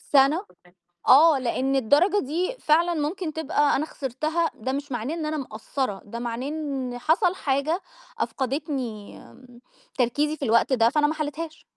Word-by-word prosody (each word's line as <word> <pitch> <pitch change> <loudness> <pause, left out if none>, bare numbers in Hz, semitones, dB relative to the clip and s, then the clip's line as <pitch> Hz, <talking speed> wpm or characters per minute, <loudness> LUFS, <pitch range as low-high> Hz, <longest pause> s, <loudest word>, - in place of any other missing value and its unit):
سنة 290 +7 +3 0.6
آه، 300 +2 +7
لأن 265 +2 0
الدرجة 300 - +3
دي 345 - -2
فعلًا 335 +3 +3
ممكن 315 +2 -2
تبقى 300 -2 +1
أنا 300 - -1
خسرتها 310 +5 -2
ده 260 +4 -4
مش 280 +1 -4
معناه 245 +5 -2
إن 325 -2 -3
أنا 310 0 -2
مقصّرة، 235 -4 -4
ده 220 +3 -7
معناه 240 +2 -4
إن 275 -5 -4
حصل 345 - +2
حاجة، 295 +4 -1 0.4
أفقدتني 265 -6 -3 0.8
تركيزي 290 +5 +1
في 290 - -5
الوقت 235 +2 +3
ده، 230 -3 +4
فأنا 295 +2 +3
ما 305 - -1
حليتهاش. 310 +1 -5
285 Hz, 150 wpm, -25 LUFS, 255-315 Hz, 0.8 s, آه